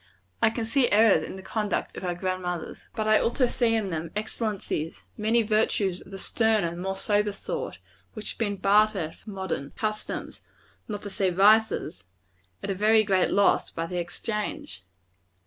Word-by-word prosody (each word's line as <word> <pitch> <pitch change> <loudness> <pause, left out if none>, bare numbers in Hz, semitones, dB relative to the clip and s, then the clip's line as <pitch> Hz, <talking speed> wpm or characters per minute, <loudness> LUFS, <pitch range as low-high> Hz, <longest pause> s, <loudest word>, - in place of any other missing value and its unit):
I - - +6
can 225 0 -3
see 245 +2 +2
errors 215 0 +6
in - - -6
the 190 - -9
conduct 210 -1 -2
of - - -7
our 175 -1 -1
grand 185 +1 -2
mothers. 180 -2 -5
But 215 -1 -1
I 215 0 +5
also 245 +2 +2
see 235 -2 +1
in 210 -4 -1
them 160 0 -3
excellencies; 210 -7 -3
many 225 +2 +2
virtues 210 -3 +1
of - - -14
the 195 - -7
sterner, 215 -4 +1
more 190 +2 -3
sober 205 +1 +1
sort, 200 - -5 0.4
which 215 - -5
have - - -13
been 205 -3 -1
bartered 200 -4 +2
for - - -13
modern 190 -8 -4
customs 215 -1 -3 0.5
not 205 -2 -5
to 205 - -6
say 190 -1 +1
vices 205 - +3 0.6
at 200 - -2
a - - +1
very 215 +3 +4
great 190 -3 +2
loss 200 0 +3
by 165 - -4
the 180 +1 -3
exchange. 175 - -4
205 Hz, 175 wpm, -27 LUFS, 185-220 Hz, 0.6 s, I